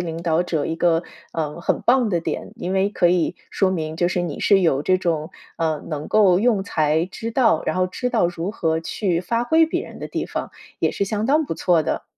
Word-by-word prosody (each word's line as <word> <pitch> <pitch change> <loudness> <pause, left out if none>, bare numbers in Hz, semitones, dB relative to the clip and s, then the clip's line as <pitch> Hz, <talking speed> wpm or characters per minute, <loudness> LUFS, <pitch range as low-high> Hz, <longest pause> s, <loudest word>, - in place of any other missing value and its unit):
领 165 -1 -4
导 170 0 +1
者 160 -4 -1
一 165 - -3
个， 170 0 +2 0.3
嗯， 155 0 -3
很 - - -1
棒 245 -2 +3
的 175 -4 0
点。 - - -4
因 185 - -4
为 195 +1 +2
可 180 -4 +2
以 175 -2 +1 0.2
说 195 - +2
明 160 -2 -3
就 175 - +2
是 180 0 0
你 165 -4 -4
是 200 -2 +4
有 150 -6 +2
这 185 +4 +2
种， 165 -3 -2 0.2
呃， 160 -2 -1
能 150 -2 -4
够 195 -4 +4
用 215 -2 +2
才， 155 -3 +1
知 225 +4 -6
道 235 -4 +3
然 - - 0
后 185 0 +1
知 250 +7 -3
道 175 - +2
如 175 +3 -4
何 160 -5 0
去 175 +1 -1
发 230 +6 -1
挥 320 +6 +4
别 - - -2
人 - - -10
的 - - -5
地 - - -3
方， - - -5 0.3
也 - - +1
是 200 - -1
相 215 +2 -2
当 300 +4 +3
不 - - -4
错 165 -1 +2
的。 - - -2
175 Hz, 250 characters per minute, -22 LUFS, 165-205 Hz, 0.3 s, 是